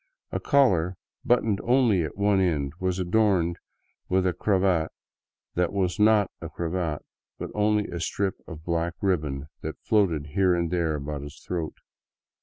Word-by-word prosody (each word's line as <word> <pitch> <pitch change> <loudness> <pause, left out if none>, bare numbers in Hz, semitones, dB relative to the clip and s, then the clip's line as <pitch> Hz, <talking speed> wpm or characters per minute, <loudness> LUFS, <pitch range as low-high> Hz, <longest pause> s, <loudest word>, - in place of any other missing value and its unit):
A - - -1
collar, 95 - +3 0.3
buttoned 115 -4 +2
only 120 -6 +3
at 80 +2 -4
one 100 -1 +3
end, 75 -7 0
was 95 -1 0
adorned 90 -2 +2 0.5
with 95 0 +2
a 90 - +2
cravat 95 -6 +1 0.6
that 90 0 +1
was 95 -2 -1
not 105 -2 +4
a - - -5
cravat, 85 -2 -3 0.3
but - - -6
only 105 0 +2
a 85 - -5
strip 95 +3 -1
of 80 0 -9
black 85 0 -1
ribbon 75 -8 -1 0.2
that - - -5
floated 85 -9 +1
here 95 -2 +3
and 85 -1 -1
there 85 -3 +1
about 75 0 -4
his 70 +3 -9
throat. 85 -3 -3
90 Hz, 155 wpm, -26 LUFS, 80-100 Hz, 0.6 s, not